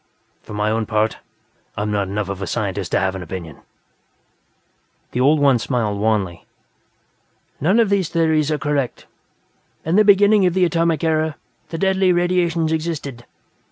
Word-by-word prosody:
For 105 Hz, -, -10 dB
my 105 Hz, +1 st, 0 dB
own 110 Hz, 0 st, -1 dB
part, 110 Hz, 0 st, 0 dB, 0.6 s
I'm 105 Hz, +1 st, -2 dB
not 100 Hz, -2 st, 0 dB
enough 100 Hz, +1 st, -3 dB
of 100 Hz, 0 st, -5 dB
a 95 Hz, -, -3 dB
scientist -, -, -3 dB
to -, -, +3 dB
have 95 Hz, -1 st, 0 dB
an 95 Hz, -, -6 dB
opinion." 85 Hz, -3 st, -7 dB, 1.5 s
The -, -, -3 dB
old 145 Hz, +4 st, +4 dB
one 135 Hz, -4 st, +4 dB
smiled 110 Hz, -5 st, -1 dB
wanly. 100 Hz, -5 st, -1 dB, 1.1 s
"None 190 Hz, -, +2 dB
of 220 Hz, -4 st, +2 dB
these 195 Hz, -5 st, +1 dB
theories 160 Hz, -2 st, +1 dB
are 155 Hz, -, 0 dB
correct. 145 Hz, -4 st, -2 dB, 0.8 s
In 165 Hz, +5 st, +1 dB
the 215 Hz, -, +6 dB
beginning 205 Hz, 0 st, +5 dB
of 180 Hz, -, -1 dB
the 185 Hz, -1 st, +4 dB
Atomic 165 Hz, -2 st, 0 dB
Era, 155 Hz, -1 st, 0 dB, 0.3 s
the 165 Hz, -, -5 dB
Deadly 190 Hz, +1 st, +2 dB
Radiations 175 Hz, -2 st, +1 dB
existed. 155 Hz, -7 st, -4 dB
150 Hz, 160 wpm, -20 LUFS, 105-170 Hz, 1.5 s, the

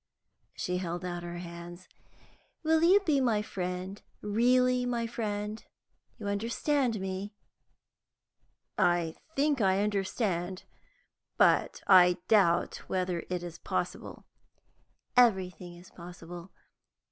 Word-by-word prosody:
She 180 Hz, 0 st, -2 dB
held 175 Hz, 0 st, -4 dB
out 175 Hz, -1 st, -4 dB
her 175 Hz, 0 st, -6 dB
hands. 175 Hz, +1 st, -9 dB, 0.8 s
"Will 320 Hz, 0 st, +3 dB
you 370 Hz, +5 st, +6 dB
be 305 Hz, -8 st, +2 dB
my 220 Hz, -5 st, +1 dB
friend, 185 Hz, 0 st, -5 dB, 0.2 s
really 250 Hz, +4 st, +3 dB
my 240 Hz, -1 st, -1 dB
friend? 215 Hz, -2 st, -4 dB, 0.5 s
You 220 Hz, -, -8 dB
understand 230 Hz, +4 st, 0 dB
me?" 190 Hz, +2 st, -5 dB, 1.4 s
"I 175 Hz, -2 st, +2 dB, 0.2 s
think 285 Hz, -2 st, +2 dB
I 195 Hz, 0 st, +3 dB
understand, 190 Hz, -3 st, -2 dB, 0.7 s
but -, -, +3 dB
I 180 Hz, -2 st, +7 dB
doubt 190 Hz, -6 st, +3 dB
whether 180 Hz, -2 st, -1 dB
it 180 Hz, -1 st, -2 dB
is 170 Hz, -1 st, -8 dB
possible." -, -, -4 dB, 0.9 s
"Everything 190 Hz, -7 st, +2 dB
is 175 Hz, +1 st, -15 dB
possible. 175 Hz, 0 st, -10 dB
190 Hz, 105 wpm, -30 LUFS, 175-230 Hz, 1.4 s, I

